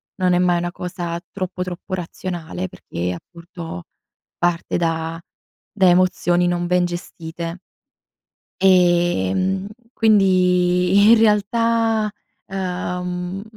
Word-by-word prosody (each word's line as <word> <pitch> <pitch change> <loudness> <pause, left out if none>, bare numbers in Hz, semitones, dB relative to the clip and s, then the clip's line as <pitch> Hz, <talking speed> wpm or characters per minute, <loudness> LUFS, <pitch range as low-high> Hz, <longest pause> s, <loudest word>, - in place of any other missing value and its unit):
Non 185 -2 +1
è 175 - +3
mai 180 -1 +3
una 175 0 -2
cosa 175 -2 -5
troppo, 185 -1 -5
troppo 180 +1 -6
razionale, 180 0 -5
perché 90 - -5
appunto 170 - -9 0.5
parte 175 0 0
da 165 0 -2 0.5
da 190 -3 +4
emozioni 175 -1 +3
non 175 0 -1
ben 180 0 +2
gestite 170 0 -6 1.0
ehm, 180 - +2 0.3
quindi 185 -2 +3
in 230 - +7
realtà, 225 +1 +2 0.4
uhm, 180 0 -4
180 Hz, 95 wpm, -21 LUFS, 175-190 Hz, 1.0 s, in